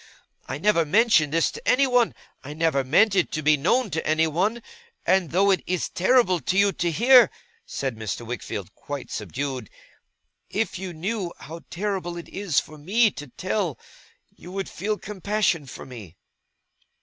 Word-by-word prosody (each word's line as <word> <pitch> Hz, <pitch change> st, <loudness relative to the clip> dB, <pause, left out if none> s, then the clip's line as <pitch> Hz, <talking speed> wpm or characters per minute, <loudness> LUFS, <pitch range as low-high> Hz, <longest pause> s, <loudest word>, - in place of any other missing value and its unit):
I 135 Hz, -, -4 dB
never 170 Hz, +1 st, +3 dB
mentioned 165 Hz, -3 st, +3 dB
this 165 Hz, +1 st, +2 dB
to 465 Hz, +2 st, -10 dB
anyone. 250 Hz, -3 st, +3 dB, 0.3 s
I 145 Hz, +2 st, -8 dB
never 160 Hz, -4 st, +1 dB
meant 195 Hz, +11 st, +4 dB
it 185 Hz, -, +2 dB
to 155 Hz, -, -2 dB
be 155 Hz, +1 st, +5 dB
known 200 Hz, -, +1 dB
to 160 Hz, -, -2 dB
anyone. 165 Hz, +9 st, +1 dB, 0.4 s
And 185 Hz, -3 st, +2 dB
though 195 Hz, +5 st, +3 dB
it 190 Hz, -, +1 dB
is 180 Hz, -1 st, -1 dB
terrible 190 Hz, -2 st, +3 dB
to 180 Hz, +7 st, -1 dB
you 200 Hz, 0 st, +5 dB
to 175 Hz, -1 st, -1 dB
hear,' 245 Hz, -, +6 dB, 0.4 s
said 135 Hz, -4 st, -3 dB
Mr. 110 Hz, +2 st, -5 dB
Wickfield, 120 Hz, +1 st, -6 dB
quite -, -, -7 dB
subdued, 130 Hz, -5 st, -4 dB, 0.8 s
'if 210 Hz, -3 st, -2 dB
you 190 Hz, -1 st, -5 dB
knew 180 Hz, +3 st, -3 dB
how 165 Hz, +2 st, -9 dB
terrible 185 Hz, -2 st, -3 dB
it 170 Hz, -, -9 dB
is 195 Hz, -7 st, 0 dB
for 155 Hz, 0 st, -10 dB
me 210 Hz, +8 st, +3 dB
to 145 Hz, -4 st, -9 dB
tell, 180 Hz, -, -2 dB, 0.6 s
you 180 Hz, -, -12 dB
would 195 Hz, 0 st, -4 dB
feel 210 Hz, +4 st, -2 dB
compassion 200 Hz, -6 st, -1 dB
for -, -, -9 dB
me! 110 Hz, -10 st, -11 dB
175 Hz, 160 wpm, -24 LUFS, 150-210 Hz, 0.8 s, hear